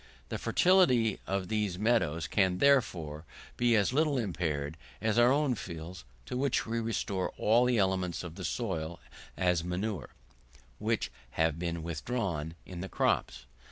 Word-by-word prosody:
The - - -3
fertility 130 - +4
of 95 -1 -1
these 105 -4 -1
meadows 100 -8 +1
can, 95 0 +2
therefore, 90 - +2 0.3
be 120 -1 +3
as 105 +3 +2
little 150 0 +2
impaired 80 - -2 0.2
as 110 +2 +1
our 120 +1 +6
own 145 -1 +2
fields, 85 - -7 0.2
to - - -5
which 135 0 +1
we 115 +1 -1
restore 105 -4 -1
all 115 +3 +4
the 125 -1 +2
elements 95 -3 0
of 85 -2 -7
the 95 +2 -8
soil, 85 -7 -3 0.4
as 90 -3 +2
manure, 90 -1 -3 0.7
which - - -1 0.3
have 80 -1 +2
been 85 -1 -3
withdrawn 85 - -3
in 90 -2 -7
the 95 - -5
crops. - - 0
95 Hz, 150 wpm, -31 LUFS, 85-115 Hz, 0.7 s, our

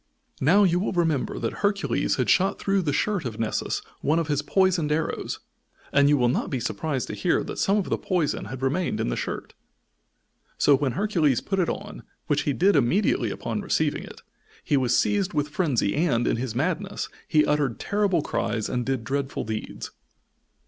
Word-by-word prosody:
Now, 180 +10 +5
you 180 -2 +3
will 195 - -1
remember 165 -6 0
that 115 - -2
Hercules 200 -1 +1
had - - 0
shot 195 +2 +3
through 195 -1 +1
the 155 -5 -1
shirt 195 +6 0
of 115 -4 -5
Nessus 110 -1 -1 0.2
one 155 +3 +2
of 165 -2 -1
his 145 -1 +1
poisoned 180 -1 +2
arrows, 160 +1 -2 0.5
and 140 0 +5
you 145 - +4
will 125 -2 +3
not 120 - 0
be 130 - -2
surprised 130 +4 -2
to - - -4
hear - - +1
that - - -6
some 200 +2 +3
of 200 - -1
the - - +1
poison 175 - -1
had 130 +5 -7
remained 165 +7 0
in - - 0
the - - -1
shirt. - - -5 1.0
So 145 - +5
when 135 -2 -1
Hercules 165 - +2
put 195 -1 -2
it 175 - +2
on, 205 +2 -5 0.2
which 145 -2 +1
he - - +2
did 190 +7 +3
immediately 150 - +2
upon - - -3
receiving - - 0
it, - - -12 0.4
he 150 - +1
was 125 -3 +2
seized 200 -4 +1
with 150 0 0
frenzy 145 - 0
and, 140 -7 +1
in - - +1
his 120 -2 -4
madness, 180 +8 -1 0.2
he 155 -2 +4
uttered 145 -6 0
terrible 200 -6 +1
cries 110 -3 -2
and 125 -1 -1
did 130 -2 -2
dreadful 135 +3 -2
deeds. 110 0 -5
150 Hz, 190 wpm, -25 LUFS, 130-185 Hz, 1.0 s, Now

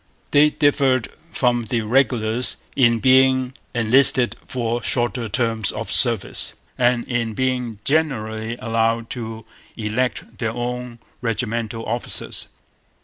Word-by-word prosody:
They 150 +1 +6
differed 135 -5 +1 0.2
from 120 -4 +1
the 115 +1 -1
regulars 115 0 +1 0.2
in 120 -3 +4
being 130 +1 +3 0.2
enlisted 125 +2 +4
for 120 -1 -2
shorter 120 -1 +1
terms 115 -2 0
of - - -5
service - - +3 0.2
and 120 -1 +1
in 120 -4 -2
being 125 -3 -1
generally 115 -7 -1
allowed 115 0 -1
to 115 -2 -6 0.3
elect 115 +3 -3
their 115 -2 -2
own 125 0 -4 0.2
regimental 115 0 -3
officers. 120 +2 -1
120 Hz, 110 wpm, -21 LUFS, 115-130 Hz, 0.3 s, They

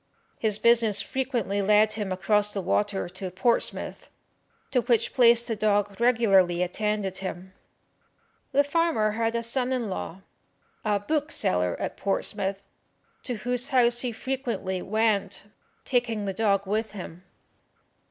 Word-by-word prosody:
His 215 -2 +2
business 230 -3 +4
frequently 240 -7 -2
led 210 +2 +4
him 210 -3 -4
across 205 +3 +1
the 195 - -1
water 200 0 0
to 185 +1 -6
Portsmouth, 190 +6 0 0.6
to 250 - +2
which 235 -2 +1
place 235 -2 +5
the 225 - -2
dog 205 0 0
regularly 195 -8 +3
attended 200 0 -2
him. 185 -1 -7 1.0
The 285 +1 +4
farmer 295 -8 +1
had 225 +1 -1
a 235 - -1
son 250 +2 0
in 240 -6 -2
law, 185 0 -6 0.6
a 210 -2 +1
bookseller 205 - 0
at - - -4
Portsmouth, 195 0 -2 0.6
to 250 - -3
whose 245 +3 -1
house 240 -2 +3
he 245 -1 -2
frequently 230 -7 -3
went, 210 -2 0 0.4
taking 235 -5 0
the 195 - -2
dog 200 -1 +1
with 215 +3 -2
him. 180 -3 -9
215 Hz, 135 wpm, -26 LUFS, 195-235 Hz, 1.0 s, place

